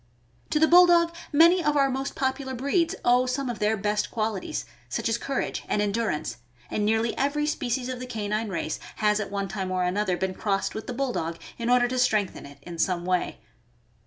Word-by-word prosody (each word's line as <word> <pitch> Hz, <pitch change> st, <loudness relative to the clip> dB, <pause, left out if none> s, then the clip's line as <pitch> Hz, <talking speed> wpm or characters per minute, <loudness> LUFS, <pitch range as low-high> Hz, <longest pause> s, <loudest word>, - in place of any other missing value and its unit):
To -, -, +1 dB
the 315 Hz, -, +6 dB
Bulldog 345 Hz, -1 st, +6 dB, 0.2 s
many 335 Hz, +4 st, +6 dB
of 295 Hz, -1 st, +2 dB
our 275 Hz, -1 st, +4 dB
most 270 Hz, +1 st, -3 dB
popular 265 Hz, 0 st, -2 dB
breeds 330 Hz, +8 st, +1 dB
owe 250 Hz, +1 st, +4 dB
some 255 Hz, 0 st, -1 dB
of 235 Hz, -, -8 dB
their 215 Hz, +1 st, +1 dB
best 210 Hz, +1 st, 0 dB
qualities, 215 Hz, -3 st, -3 dB, 0.2 s
such -, -, -2 dB
as 230 Hz, +1 st, 0 dB
courage 275 Hz, -2 st, -2 dB
and -, -, +1 dB
endurance, 210 Hz, -, -1 dB, 0.3 s
and 210 Hz, -, 0 dB
nearly 220 Hz, +2 st, +1 dB
every 285 Hz, +2 st, +1 dB
species 255 Hz, -4 st, -1 dB
of 255 Hz, -1 st, -4 dB
the 255 Hz, -, -6 dB
canine 215 Hz, -1 st, -2 dB
race 170 Hz, -4 st, -3 dB, 0.2 s
has 210 Hz, -1 st, +2 dB
at 210 Hz, -, -3 dB
one 200 Hz, -1 st, -2 dB
time 190 Hz, -2 st, -4 dB
or 185 Hz, -1 st, 0 dB
another 185 Hz, 0 st, 0 dB
been 190 Hz, +1 st, -1 dB
crossed 195 Hz, 0 st, -1 dB
with 220 Hz, -, -6 dB
the 250 Hz, -, -3 dB
Bulldog 235 Hz, -11 st, -2 dB, 0.2 s
in 235 Hz, 0 st, -1 dB
order 245 Hz, 0 st, +4 dB
to 255 Hz, +1 st, -2 dB
strengthen 215 Hz, -, +1 dB
it 140 Hz, 0 st, -14 dB
in 170 Hz, 0 st, -8 dB
some 175 Hz, -1 st, 0 dB
way. 180 Hz, -1 st, -1 dB
230 Hz, 200 wpm, -26 LUFS, 200-270 Hz, 0.3 s, the